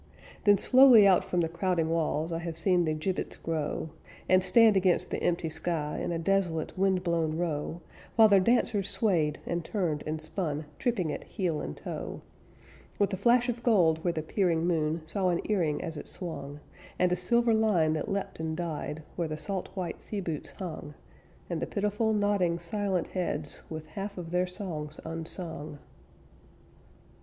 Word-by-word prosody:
Then 205 -1 +7
slowly 250 -1 +7
out 190 -2 +5
from 180 - 0
the 165 - +1
crowding 170 0 0
walls 165 0 0
I 165 - -2
have 170 -1 -5
seen 175 +1 +3
the 155 - 0
gibbets 180 +4 -2
grow, 160 -1 -3 0.4
And 185 0 +4
stand 225 -1 +6
against 185 -2 +2
the - - -2
empty 175 -1 0
sky 160 -1 -2
In - - -2
a 170 - -1
desolate, 170 -2 0
windblown 175 -4 +1
row, 165 0 -2 0.3
While 225 -1 +8
their 200 -2 +6
dancers 215 -1 +2
swayed, 165 -9 +1
and 170 0 -2
turned, 165 -6 -1
and 155 +1 -2
spun, 155 -2 -3
Tripping 195 -10 0
it - - -5
heel 170 -6 -2
and 75 - -6
toe; - - -6 0.7
With 200 0 +1
a - - +2
flash 240 +5 +3
of 240 -1 -2
gold 170 -9 +3
where 175 - +2
the 160 -2 -3
peering 170 -1 +1
moon 160 -2 0
Saw 185 +3 0
an 175 - +1
earring 170 -8 0
as 160 - -4
it - - -7
swung, 145 -5 -6 0.4
And 180 0 +2
a - - +3
silver 235 +6 +2
line 200 -8 +3
that 155 +6 -3
leapt 195 -2 -3
and 160 0 -3
died 160 -2 -4
Where 170 -2 -1
the 155 0 -4
salt 185 +5 -4
white 180 -3 -4
sea 210 - -4
boots 165 -6 -4
hung, 160 -5 -6 0.5
And 170 -2 -3
the - - -2
pitiful, 210 +2 0
nodding, 205 -5 +2
silent 185 +1 -2
heads, 155 -5 -2
With 155 -1 -6
half 195 +6 -6
of 170 -2 -6
their 180 +1 +1
songs 160 -5 -6
unsung. 160 -2 -5
175 Hz, 175 wpm, -29 LUFS, 160-195 Hz, 0.7 s, While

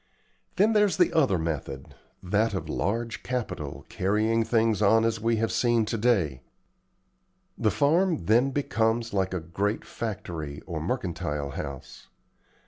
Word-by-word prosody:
Then 210 +3 +4
there's 210 -6 +3
the 180 - +3
other 135 - +3
method 75 -5 -4 0.3
that 105 +3 +1
of 80 -4 -4
large 115 +8 -2
capital 115 - -4
carrying 110 +4 +1
things 110 -2 +1
on 110 +2 +5
as 115 -1 0
we 115 +1 +2
have 115 +1 0
seen 120 -2 +2
to 110 - -2
day. 95 - +1 1.1
The 110 - +1
farm 155 - +2
then 120 +7 +4
becomes 115 -5 0
like 95 -1 0
a 90 - -2
great 100 +6 -2
factory 85 -10 -5
or 80 -3 -4
mercantile 85 - -3
house. 70 -1 -7
110 Hz, 135 wpm, -27 LUFS, 85-115 Hz, 1.1 s, on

